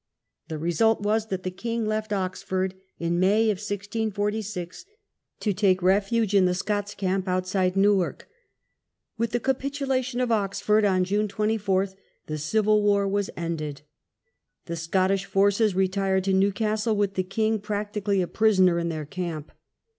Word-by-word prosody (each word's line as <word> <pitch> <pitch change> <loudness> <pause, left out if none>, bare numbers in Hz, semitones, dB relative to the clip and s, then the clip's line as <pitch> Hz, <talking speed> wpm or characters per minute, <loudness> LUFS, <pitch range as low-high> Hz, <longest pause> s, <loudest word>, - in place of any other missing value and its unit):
The 155 - -4
result 205 +8 +2
was 215 +1 0
that 190 -3 -4
the 185 - -3
king 230 +4 -3
left 215 0 -2
Oxford 185 -1 -2 0.2
in 170 +1 -1
May, 210 +4 +3
1646, 205 - -3 0.6
to 210 - +1
take 185 -2 +2
refuge 205 +3 +2
in 195 -2 +5
the 180 0 +1
Scots 205 +1 -2
camp 190 0 -1
outside 185 0 0
Newark. 195 -2 +2 0.9
With 230 0 +1
the 240 +2 -1
capitulation 265 -1 -1
of 250 -2 0
Oxford 210 0 +2
on 185 -2 +3
June 205 +3 0
24 200 -2 0 0.4
the 155 0 -4
civil 210 +7 +2
war 200 -1 +2
was 200 0 -1
ended. 155 -4 -4 0.8
The 170 - -4
Scottish 185 +4 0
forces 200 +1 +2
retired 190 0 +1
to 195 0 +1
Newcastle 215 +3 +1
with 205 -1 0
the 190 - 0
king 215 +4 0
practically 205 -1 -1
a - - -3
prisoner 190 -5 +3
in 170 0 -1
their 155 -2 -4
camp. 165 -2 -5
200 Hz, 145 wpm, -25 LUFS, 185-215 Hz, 0.9 s, in